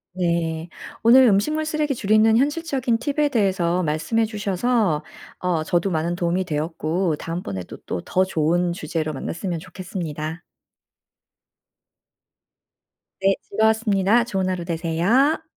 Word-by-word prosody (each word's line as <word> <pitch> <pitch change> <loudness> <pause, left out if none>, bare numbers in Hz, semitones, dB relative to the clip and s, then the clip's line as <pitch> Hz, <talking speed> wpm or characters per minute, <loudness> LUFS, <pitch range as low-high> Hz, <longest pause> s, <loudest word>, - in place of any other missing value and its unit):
네. 170 -2 -1 0.3
오늘 245 +4 +7
음식물 250 +9 +2
쓰레기 305 -2 -1
줄이는 215 +1 +4
현실적인 275 -4 0
팁에 290 +4 0
대해서 185 -7 +1
말씀해 160 +8 0
주셔서 210 -4 0 0.4
어 175 -3 0
저도 175 +4 0
많은 170 0 -1
도움이 175 +1 0
되었고 160 +2 -1
다음번에 165 - -5
또 - - -9
또 90 - -3
더 185 - +2
좋은 175 0 +1
주제로 155 -1 -3
만났으면 170 +5 -4
좋겠습니다. 165 -3 -6 2.8
네. 195 0 +3
즐거웠습니다. 220 0 +3
좋은 190 -5 -1
하루 180 -2 -3
되세요. 175 - +1
185 Hz, 280 characters per minute, -22 LUFS, 165-225 Hz, 2.8 s, 오늘